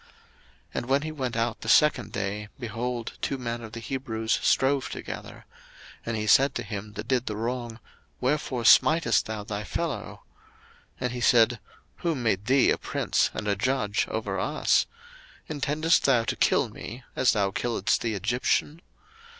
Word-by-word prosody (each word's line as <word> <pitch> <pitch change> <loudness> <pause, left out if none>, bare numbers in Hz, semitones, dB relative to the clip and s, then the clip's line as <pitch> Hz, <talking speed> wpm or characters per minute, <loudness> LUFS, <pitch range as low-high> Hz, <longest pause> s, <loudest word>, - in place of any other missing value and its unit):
02:002:013 - - -26 0.6
And - - -3
when 135 +2 +3
he 155 - -4
went 130 -6 -3
out 115 0 -1
the 110 - -4
second 140 -6 +4
day, 100 +1 -3
behold, 120 0 -4
two 135 - -1
men 120 -2 -4
of 110 -1 -9
the 115 - -5
Hebrews 115 -3 -2
strove 135 0 +2
together: - - -8 0.6
and 115 -1 -3
he 105 - -2
said 135 +7 +5
to - - -2
him 105 -1 -6
that - - -7
did 130 -2 0
the 105 - -2
wrong, 120 +1 -4 0.4
Wherefore 130 -2 -1
smitest 120 - +5
thou 110 -1 -4
thy 105 0 -4
fellow? - - -4 0.8
02:002:014 - - -24
And 125 -1 -1
he 125 0 -5
said, 120 -1 +4 0.4
Who 170 -2 -1
made 110 -5 -1
thee 135 +1 +4
a - - 0
prince - - 0
and 105 - -4
a 100 - +2
judge 110 -1 0
over 100 -3 -3
us? 150 +10 +2 0.6
intendest 155 +2 +1
thou 125 -4 +4
to - - -2
kill - - +2
me, 120 +3 -9
as 130 - +3
thou 100 -2 +1
killedst 115 -1 0
the 115 -2 -2
Egyptian? 130 - 0
120 Hz, 170 wpm, -27 LUFS, 110-130 Hz, 0.8 s, said